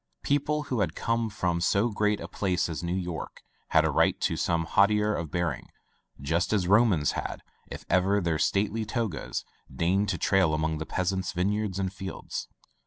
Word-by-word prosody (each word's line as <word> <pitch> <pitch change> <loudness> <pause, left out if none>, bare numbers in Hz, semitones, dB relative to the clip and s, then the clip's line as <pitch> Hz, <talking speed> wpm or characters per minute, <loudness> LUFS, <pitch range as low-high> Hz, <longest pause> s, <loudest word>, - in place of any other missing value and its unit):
People 145 +1 +1
who 125 -7 0
came 115 +7 -1
from 90 -5 -1
so 100 +7 +2
great 105 0 +1
a - - -6
place 90 -3 0
as 80 - -4
New 85 +1 -2
York 90 -3 -5 0.2
had - - +4
a - - +1
right - - +2
to - - +1
some 85 -1 0
hauteur 105 +4 +3
of 85 -5 -3
bearing, 85 -1 -2 0.5
just 80 +6 0
as 95 -4 +1
Romans 100 -7 +4
had, - - -5 0.2
if - - -8
ever 95 +2 +3
their 85 -4 0
stately 105 +5 +1
togas 110 -4 -3 0.3
deigned 95 +9 +1
to 90 - 0
trail 90 -2 +3
among 80 0 -1
the 80 - -5
peasants' 95 0 -1
vineyards 100 +2 -1
and 95 -1 -2
fields. 95 -1 -6
95 Hz, 175 wpm, -28 LUFS, 85-105 Hz, 0.5 s, had